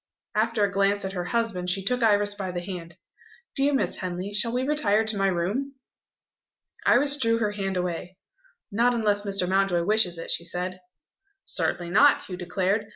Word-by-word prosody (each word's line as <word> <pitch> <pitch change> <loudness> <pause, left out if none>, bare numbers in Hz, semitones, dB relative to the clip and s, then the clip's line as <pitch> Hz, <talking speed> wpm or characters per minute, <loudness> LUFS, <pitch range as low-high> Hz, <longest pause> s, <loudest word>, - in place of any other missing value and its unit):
After 220 0 +1
a 200 - +1
glance 200 0 +1
at 190 - -4
her 180 -2 -3
husband, 220 -5 -1
she 195 +2 0
took 250 +5 -1
Iris 205 -2 +3
by 195 -2 -5
the 180 -1 -3
hand: 175 -2 -7 0.6
"Dear 275 +1 +3
Miss - - 0
Henley, 185 +2 -4
shall 230 +3 +2
we 250 +2 -1
retire 260 -7 +2
to 220 0 +1
my 195 -1 +1
room?" 200 +11 -1 1.1
Iris 280 +3 +4
drew 230 -4 +2
her 215 -2 0
hand 195 -2 -3
away. 180 0 -4 0.5
"Not 240 +4 +2
unless 210 -3 +1
Mr. 195 -3 -2
Mountjoy 190 -2 +2
wishes 190 -3 +2
it," 165 - -4
she - - 0
said. 180 +2 -4 0.7
"Certainly 175 -1 -1
not!" 280 +10 +5
Hugh 185 - -6
declared. 190 +4 -1
200 Hz, 175 wpm, -26 LUFS, 180-225 Hz, 1.1 s, not